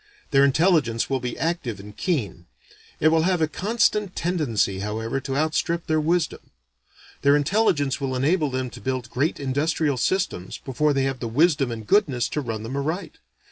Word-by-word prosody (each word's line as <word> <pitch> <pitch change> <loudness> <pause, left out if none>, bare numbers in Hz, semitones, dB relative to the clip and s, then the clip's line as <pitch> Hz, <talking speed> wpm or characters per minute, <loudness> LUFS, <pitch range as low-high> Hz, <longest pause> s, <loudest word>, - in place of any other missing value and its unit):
Their 135 0 +5
intelligence 140 -5 +2
will 135 - +1
be 125 -1 -4
active 160 - -2
and 105 +1 -11
keen. 105 - -2 0.5
It 155 - +5
will 160 0 +3
have 180 +1 +1
a 160 - +2
constant 210 +1 0
tendency 130 - 0
however 110 +5 -2
to 135 0 -3
outstrip 165 +2 0
their 155 -1 +1
wisdom. 165 +1 0 0.8
Their 140 +1 +5
intelligence 145 -4 +1
will 130 -1 -2
enable 150 +4 +1
them 130 -1 -3
to - - -11
build 130 -2 -3
great 145 +6 0
industrial 145 +1 0
systems 125 - -1
before 145 +3 0
they 135 -1 +1
have 135 -1 -2
the 120 - -3
wisdom 140 +2 +2
and 110 -2 -6
goodness 130 - +2
to 150 - -2
run 115 -4 -4
them 120 +4 -5
aright. 160 +4 -3
140 Hz, 175 wpm, -24 LUFS, 125-165 Hz, 0.8 s, Their